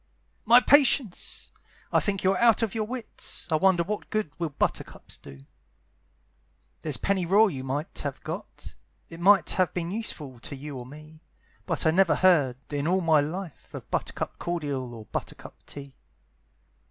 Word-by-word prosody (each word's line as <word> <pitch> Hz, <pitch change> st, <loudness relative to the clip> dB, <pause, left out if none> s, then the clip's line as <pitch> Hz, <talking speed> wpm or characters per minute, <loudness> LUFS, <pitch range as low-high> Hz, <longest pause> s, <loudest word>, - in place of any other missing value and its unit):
"My 235 Hz, +2 st, +8 dB
patience! 265 Hz, -7 st, +2 dB, 0.4 s
I -, -, +5 dB
think 195 Hz, -2 st, -2 dB
you 190 Hz, -, +4 dB
are 195 Hz, -, 0 dB
out 230 Hz, -1 st, +5 dB
of 220 Hz, -, -1 dB
your 220 Hz, -2 st, -1 dB
wits; 245 Hz, 0 st, -4 dB
I -, -, +4 dB
wonder 185 Hz, 0 st, +3 dB
what 210 Hz, +4 st, -5 dB
good 215 Hz, -8 st, -2 dB
will 165 Hz, -2 st, -1 dB
buttercups 140 Hz, -, -3 dB
do? 70 Hz, -, -13 dB, 1.4 s
"There's 150 Hz, -4 st, 0 dB
pennyroyal 195 Hz, +2 st, +3 dB
you 130 Hz, -3 st, -6 dB
might 140 Hz, +4 st, -4 dB
have 140 Hz, -2 st, -4 dB
got, -, -, -7 dB, 0.4 s
It 165 Hz, -, -9 dB
might 195 Hz, +3 st, +5 dB
have 185 Hz, -2 st, 0 dB
been 175 Hz, -1 st, -2 dB
useful 150 Hz, -, -5 dB
to 140 Hz, -, -7 dB
you 145 Hz, +1 st, -8 dB
or 125 Hz, -1 st, -7 dB
me, 155 Hz, +3 st, -13 dB, 0.5 s
But -, -, -1 dB
I 160 Hz, -, +5 dB
never 185 Hz, +1 st, +4 dB
heard, 150 Hz, -10 st, +3 dB, 0.2 s
in 145 Hz, +1 st, -1 dB
all 185 Hz, +2 st, +2 dB
my 160 Hz, -3 st, +4 dB
life, 165 Hz, +3 st, -5 dB
Of -, -, -10 dB
buttercup -, -, -3 dB
cordial 145 Hz, -8 st, -3 dB
or 110 Hz, -1 st, -10 dB
buttercup -, -, -7 dB
tea. 140 Hz, -1 st, -10 dB
170 Hz, 165 wpm, -26 LUFS, 145-195 Hz, 1.4 s, My